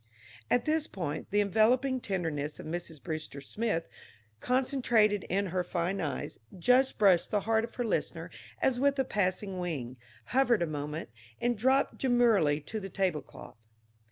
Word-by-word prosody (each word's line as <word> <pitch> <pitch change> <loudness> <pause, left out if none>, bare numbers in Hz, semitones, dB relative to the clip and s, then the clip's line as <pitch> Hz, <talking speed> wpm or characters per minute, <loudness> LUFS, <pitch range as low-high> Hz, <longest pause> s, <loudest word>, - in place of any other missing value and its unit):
At 245 - +2
this 310 0 +1
point 155 -5 -5
the 205 +1 +3
enveloping 245 +6 +3
tenderness 160 -8 -3
of - - -8
Mrs. 160 -1 -5
Brewster 155 -1 -5
Smith 170 +4 -2 0.5
concentrated 240 -6 +2
in 200 +3 0
her 180 0 -1
fine 180 +2 -2
eyes, 150 -4 -4 0.2
just 250 +8 +3
brushed 190 -5 +4
the 205 - +1
heart 220 +2 +1
of 230 - -7
her 245 - -1
listener 225 - -2 0.3
as 250 -2 +2
with 280 +1 +2
a 265 - +1
passing 195 -3 -1
wing, 135 -8 -4 0.4
hovered 245 -7 +4
a - - +1
moment, 150 -1 -5 0.3
and 240 0 +1
dropped 260 +5 +2
demurely 230 - +3
to 215 +9 -5
the 195 -1 -7
tablecloth. 180 - -3
200 Hz, 155 wpm, -30 LUFS, 165-245 Hz, 0.5 s, brushed